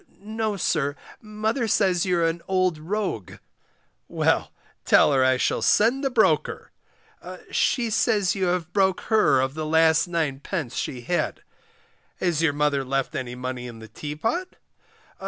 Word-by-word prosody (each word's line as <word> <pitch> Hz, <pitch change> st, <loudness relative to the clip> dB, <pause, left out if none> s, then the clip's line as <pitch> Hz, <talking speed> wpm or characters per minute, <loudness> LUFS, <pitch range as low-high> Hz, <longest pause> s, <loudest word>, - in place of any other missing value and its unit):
No, 215 Hz, 0 st, -3 dB
sir, 145 Hz, -5 st, 0 dB, 0.3 s
mother 220 Hz, +3 st, -2 dB
says 190 Hz, -4 st, +2 dB
you're 175 Hz, -2 st, +2 dB
an 165 Hz, +1 st, -1 dB
old 185 Hz, -4 st, +1 dB
rogue. 180 Hz, -, -3 dB, 0.7 s
Well, -, -, 0 dB, 0.3 s
tell -, -, +5 dB
her 135 Hz, -1 st, +3 dB
I 130 Hz, 0 st, +3 dB
shall -, -, 0 dB
send 240 Hz, +6 st, +3 dB
the 270 Hz, -, +1 dB
broker. 205 Hz, -, +1 dB, 0.8 s
She 235 Hz, -3 st, +1 dB
says 215 Hz, -4 st, +2 dB
you 190 Hz, -1 st, -1 dB
have 175 Hz, -1 st, -2 dB
broke 190 Hz, -2 st, +2 dB
her 215 Hz, -11 st, +4 dB
of 130 Hz, +1 st, 0 dB
the 155 Hz, +1 st, -4 dB
last 160 Hz, +1 st, +3 dB
9d. 155 Hz, -3 st, -3 dB
she 125 Hz, -, -4 dB
had. 175 Hz, +9 st, -2 dB, 0.7 s
Has 170 Hz, -4 st, 0 dB
your 165 Hz, -3 st, +3 dB
mother 145 Hz, -1 st, 0 dB
left 135 Hz, 0 st, -2 dB
any 125 Hz, -1 st, -4 dB
money 125 Hz, 0 st, -5 dB
in 120 Hz, -2 st, -9 dB
the 110 Hz, 0 st, -11 dB
teapot? 155 Hz, -, -4 dB
170 Hz, 145 wpm, -24 LUFS, 140-205 Hz, 0.8 s, tell